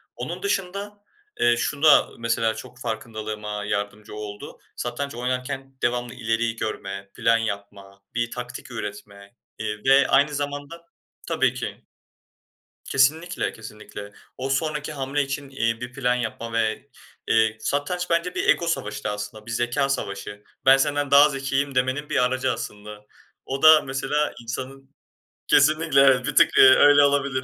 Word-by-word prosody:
Onun - - -6
dışında, 205 - -3 0.4
eee, 120 0 +4
şu 140 +4 -3
da 155 - +6
mesela 115 -1 0
çok 120 +2 -11
farkındalığıma 110 -3 -5
yardımcı 105 +1 -4
oldu 105 -1 -8 0.2
satranç 120 +2 -4
oynarken 130 +2 -4
devamlı 120 0 -1
ileriyi 115 -1 -1
görme, 100 -3 -5
plan 115 0 +3
yapma, 100 -2 -6
bir 120 0 -1
taktik 125 0 -7
üretme, 100 -1 -8 0.2
eee, 105 -1 -4
ve 135 +1 +5
aynı 145 +2 +3
zamanda 145 +4 -5 0.4
Tabii - - +1
ki. - - -6 1.0
Kesinlikle, 160 +6 +1
kesinlikle. 105 -2 -10 0.2
O 130 +1 -4
sonraki 150 +2 -2
hamle 140 +1 -1
için, 140 0 -5
eee, 115 -3 -1
bir 125 0 -6
plan 125 -3 +1
yapma 115 -1 -4
ve, 115 +4 -1 0.4
eee, 110 -1 +3
satranç 175 +8 -2
bence 170 +2 0
bir - - 0
ego 170 - +3
savaşı 105 -10 -3
da 105 - -1
aslında, 105 +1 -7
bir 115 - -7
zekâ 120 +4 0
savaşı. 100 -4 -4 0.2
"Ben 135 +1 +7
senden 145 0 0
daha 145 +2 +8
zekiyim," 135 0 -2
demenin 130 +4 0
bir 125 - +2
aracı 130 +1 0
aslında. 105 0 -7 0.4
O 135 +1 -4
da, 155 -1 +8
mesela, 145 +2 -1
insanın 135 +4 -8 0.5
Kesinlikle 155 0 +4
evet, 130 -2 +5
bir - - -3
tık, - - +5
eee, - - +9
öyle 145 +2 +7
olabilir. 140 -2 +1
125 Hz, 145 wpm, -24 LUFS, 110-140 Hz, 1.0 s, eee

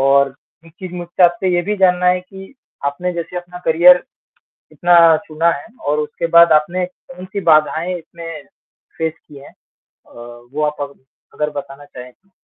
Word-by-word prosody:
और 135 0 +3 0.3
एक 165 - -18
चीज़ 185 -1 -7
मुझसे 175 +1 -2
आपसे 175 +1 +1
ये 175 - +1
भी 210 +2 -2
जानना 180 -2 +2
है 180 0 +3
कि 190 +4 -13 0.3
आपने 180 +6 -2
जैसे 170 +1 -6
अपना 175 0 -7
करियर 175 +3 +6 0.7
इतना 175 +3 +2 0.3
चुना 165 +2 +1
है 145 +3 -6 0.2
और 150 +1 +1
उसके 150 +2 -3
बाद 170 0 +7
आपने 175 +4 +1
कौन 180 0 -14
सी 190 +2 -5
बाधाएँ 160 +3 +2
इसमें 165 -2 -10 0.5
फेस 160 -1 -2
की 145 -2 -14
है? 140 - -14 0.4
अ, - - -27 0.4
वो 150 +1 -2
आप 150 -1 -4
अग 140 0 -6 0.4
अगर 150 0 -1
बताना 140 +1 -12
चाहे 125 -1 -12
तो? 195 +10 -39
170 Hz, 175 wpm, -17 LUFS, 150-180 Hz, 0.7 s, बाद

